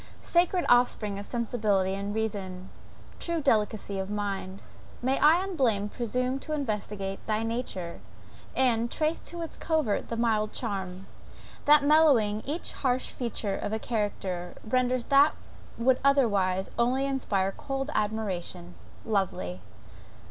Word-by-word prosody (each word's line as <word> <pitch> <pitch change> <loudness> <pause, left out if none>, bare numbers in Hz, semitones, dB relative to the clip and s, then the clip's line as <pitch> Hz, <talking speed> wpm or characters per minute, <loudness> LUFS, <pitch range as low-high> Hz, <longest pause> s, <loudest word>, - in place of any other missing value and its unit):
Sacred 350 +1 +2
offspring 220 -4 +3
of 200 - -7
sensibility 215 -5 0
and 200 +1 -3
reason! 195 -4 -3 0.5
true 340 -1 -2
delicacy 215 -6 +1
of 190 0 -3
mind! 200 -2 -3 0.4
may 260 +2 +1
I 325 +5 +5
unblamed 240 - 0
presume 250 +3 -1
to 310 - -5
investigate 210 -7 -3
thy 215 0 0
nature, 225 -7 -4 0.5
and 235 -3 +3
trace 310 +4 0
to 340 -1 -6
its 325 - -6
covert 310 -10 0
the 230 - -3
mild 215 -2 +1
charm, 190 -4 -4 0.6
that 295 0 +7
mellowing 280 -9 +4
each 310 +5 -3
harsh 255 -1 -1
feature 225 -5 -3
of 210 - -3
a - - +1
character, 195 -6 -3
renders 255 +1 +1
what 280 +2 +6 0.4
would 255 +2 +3
otherwise 200 -9 +2
only 255 +3 +2
inspire 205 -8 0
cold 270 +1 -3
admiration 190 -5 -2 0.3
lovely! 180 - -1
225 Hz, 125 wpm, -28 LUFS, 200-265 Hz, 0.6 s, that